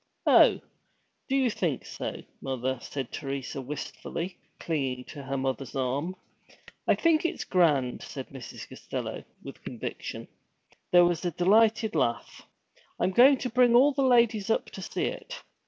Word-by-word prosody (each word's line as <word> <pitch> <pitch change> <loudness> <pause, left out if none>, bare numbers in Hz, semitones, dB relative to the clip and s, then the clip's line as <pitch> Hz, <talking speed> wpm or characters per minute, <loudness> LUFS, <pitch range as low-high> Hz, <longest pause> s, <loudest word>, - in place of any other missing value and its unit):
'Oh, - - +6 0.7
do 270 - +1
you 260 -3 +3
think 165 -10 -2
so, - - -6 0.2
mother?' 130 -1 -2
said 135 -4 -5
Teresa 135 -1 -4
wistfully, 150 +6 -6 0.2
clinging 135 -6 -2
to 145 - -9
her 135 0 -3
mother's 135 0 -3
arm. 135 +7 -1 0.7
'I - - +5
think 325 -2 +3
it's 340 - -2
grand!' 150 -9 +2
said 135 -3 -7
Mrs. 135 -3 -9
Costello, - - -6 0.2
with - - -10
conviction. - - -6 0.6
There 175 0 +7
was 175 -1 0
a 175 - +1
delighted 215 +5 +3
laugh. 115 - -2 0.5
'I'm 185 - +2
going 260 +7 +7
to 250 - -3
bring 245 0 +5
all 270 +4 +6
the 280 0 -1
ladies 235 -5 +3
up 225 - 0
to - - -8
see - - -3
it.' - - -6
175 Hz, 150 wpm, -28 LUFS, -, 0.7 s, There